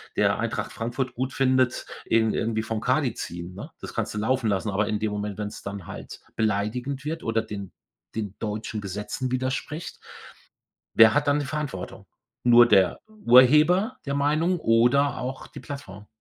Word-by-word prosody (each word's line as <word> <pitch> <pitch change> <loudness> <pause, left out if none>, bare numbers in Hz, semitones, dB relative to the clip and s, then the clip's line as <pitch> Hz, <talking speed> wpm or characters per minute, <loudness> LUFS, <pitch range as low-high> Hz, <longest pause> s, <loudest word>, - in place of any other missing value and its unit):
der - - +2
Eintracht - - -2
Frankfurt 120 +2 -3
gut 130 +2 -2
findet, 130 -1 +2 0.2
ihn 110 -1 +2
irgendwie 110 -1 -1
vom 110 0 -3
Kadi 125 +2 +1
ziehen, 85 -2 -7
ne? - - -8
Das - - -8
kannst - - -2
du - - -5
laufen 120 +2 +1
lassen, 100 +2 0
aber 105 +1 0
in 105 - -1
dem 110 -1 -1
Moment, 105 -1 -4
wenn's 105 -1 -5
dann 100 -3 -6
halt - - -9 0.2
beleidigend 110 +6 -1
wird 160 +2 -4
oder 115 0 +1
den 105 -3 -7 0.4
den 105 -3 -4
deutschen 110 0 -4
Gesetzen 105 +6 -4
widerspricht, 130 +5 -3 1.0
wer 110 -1 +8
hat 145 0 +2
dann 145 +1 +3
die 145 - -3
Verantwortung? 145 -11 -5 0.4
Nur 120 0 +8
der 95 -5 +4
Urheber 175 - +5
der 140 - -1
Meinung 155 +5 +1
oder 125 +5 +3
auch 130 +1 -5
die - - -10
Plattform? 105 -8 -9
120 Hz, 165 wpm, -25 LUFS, 105-140 Hz, 1.0 s, wer